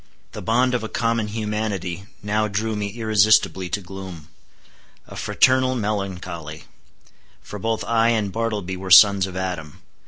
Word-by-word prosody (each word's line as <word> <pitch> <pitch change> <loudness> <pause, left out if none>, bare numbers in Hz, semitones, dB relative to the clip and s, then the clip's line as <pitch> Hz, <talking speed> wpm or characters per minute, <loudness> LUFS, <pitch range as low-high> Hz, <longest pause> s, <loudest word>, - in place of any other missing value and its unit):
The - - -8
bond 125 +3 +1
of 125 - -1
a 110 - -5
common 115 -2 -1
humanity 105 -4 -4 0.2
now 105 +1 0
drew 110 +2 -2
me 105 -1 -2
irresistibly 110 -3 +2
to 100 +3 -2
gloom. 95 -4 -10 0.8
A - - -12
fraternal 130 0 +2
melancholy! 95 -7 -4 0.8
For 105 - -8
both 115 0 -2
I 115 +2 +2
and 110 -4 0
Bartleby 105 -4 -3
were 95 0 -7
sons 100 0 +7
of 95 -1 -7
Adam. 90 -5 -5
105 Hz, 145 wpm, -22 LUFS, 95-110 Hz, 0.8 s, sons